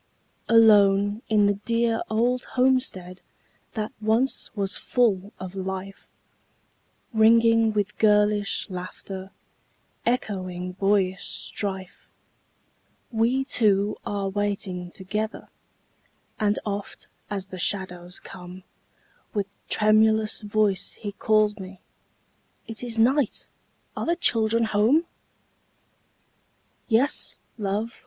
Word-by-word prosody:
Alone 205 Hz, -2 st, +5 dB
in 210 Hz, -2 st, +4 dB
the 205 Hz, -, +3 dB
dear 230 Hz, +2 st, 0 dB
old 240 Hz, +3 st, +1 dB
homestead 250 Hz, -9 st, +1 dB, 0.5 s
That 215 Hz, -2 st, -3 dB
once 225 Hz, +5 st, +1 dB
was 195 Hz, -2 st, -1 dB
full 205 Hz, -5 st, +1 dB
of 185 Hz, 0 st, -7 dB
life, 190 Hz, 0 st, -6 dB, 1.0 s
Ringing 230 Hz, 0 st, +5 dB
with 210 Hz, -1 st, -2 dB
girlish 210 Hz, -1 st, +3 dB
laughter, 185 Hz, 0 st, -7 dB, 0.7 s
Echoing 185 Hz, -6 st, -2 dB
boyish 195 Hz, 0 st, +1 dB
strife, 195 Hz, -1 st, -4 dB, 1.0 s
We 235 Hz, +4 st, +1 dB
two 210 Hz, -6 st, +2 dB
are 200 Hz, -1 st, -2 dB
waiting 195 Hz, -3 st, -3 dB
together; 210 Hz, +5 st, -4 dB, 0.9 s
And 210 Hz, -1 st, +2 dB
oft, 205 Hz, -1 st, -5 dB, 0.2 s
as 195 Hz, -1 st, -4 dB
the 185 Hz, -, -7 dB
shadows 180 Hz, -1 st, -2 dB
come, 180 Hz, 0 st, -11 dB, 0.7 s
With 200 Hz, -1 st, -1 dB, 0.2 s
tremulous 215 Hz, 0 st, +3 dB
voice 210 Hz, -2 st, 0 dB
he 205 Hz, -, -6 dB
calls 215 Hz, +1 st, +2 dB
me, 190 Hz, 0 st, -9 dB, 0.9 s
"It 225 Hz, -1 st, -7 dB
is 235 Hz, -2 st, -3 dB
night! 255 Hz, +2 st, +2 dB, 0.5 s
are -, -, -3 dB
the 340 Hz, -, +2 dB
children 230 Hz, -7 st, +3 dB
home?" 225 Hz, +10 st, +3 dB, 1.8 s
"Yes, 250 Hz, +5 st, +1 dB, 0.2 s
love!" 210 Hz, +3 st, -2 dB
210 Hz, 95 wpm, -25 LUFS, 195-225 Hz, 1.8 s, Alone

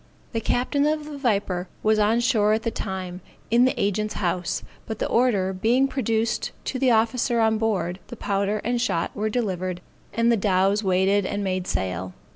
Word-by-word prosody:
The 225 Hz, -, -2 dB
captain 280 Hz, +6 st, +1 dB
of 305 Hz, 0 st, 0 dB
the 300 Hz, -1 st, -7 dB
Viper 200 Hz, -7 st, 0 dB, 0.2 s
was 215 Hz, 0 st, +3 dB
on 220 Hz, +3 st, +3 dB
shore 215 Hz, -4 st, +3 dB
at 220 Hz, 0 st, 0 dB
the 230 Hz, -, -1 dB
time, 185 Hz, -3 st, -5 dB, 0.3 s
in 240 Hz, +2 st, +5 dB
the 260 Hz, -, 0 dB
agent's 210 Hz, +2 st, 0 dB
house, 180 Hz, -2 st, -1 dB, 0.2 s
but 220 Hz, -, -4 dB
the -, -, -1 dB
order 210 Hz, -6 st, +2 dB
being 235 Hz, +8 st, +2 dB
produced 230 Hz, -4 st, -1 dB
to 260 Hz, -, -3 dB
the 260 Hz, -1 st, +3 dB
officer 230 Hz, +1 st, +2 dB
on 220 Hz, -1 st, +3 dB
board, 190 Hz, -5 st, -1 dB
the -, -, -8 dB
powder 200 Hz, +1 st, -1 dB
and 240 Hz, +1 st, 0 dB
shot 170 Hz, -9 st, -1 dB
were 215 Hz, +1 st, -1 dB
delivered, 185 Hz, -6 st, -2 dB, 0.3 s
and 230 Hz, +2 st, +2 dB
the 230 Hz, -, +3 dB
dows 195 Hz, +1 st, +2 dB
weighed 190 Hz, +2 st, +2 dB
and 205 Hz, 0 st, -2 dB
made 185 Hz, -1 st, -2 dB
sail. 90 Hz, 0 st, -3 dB
215 Hz, 185 wpm, -24 LUFS, 190-235 Hz, 0.3 s, in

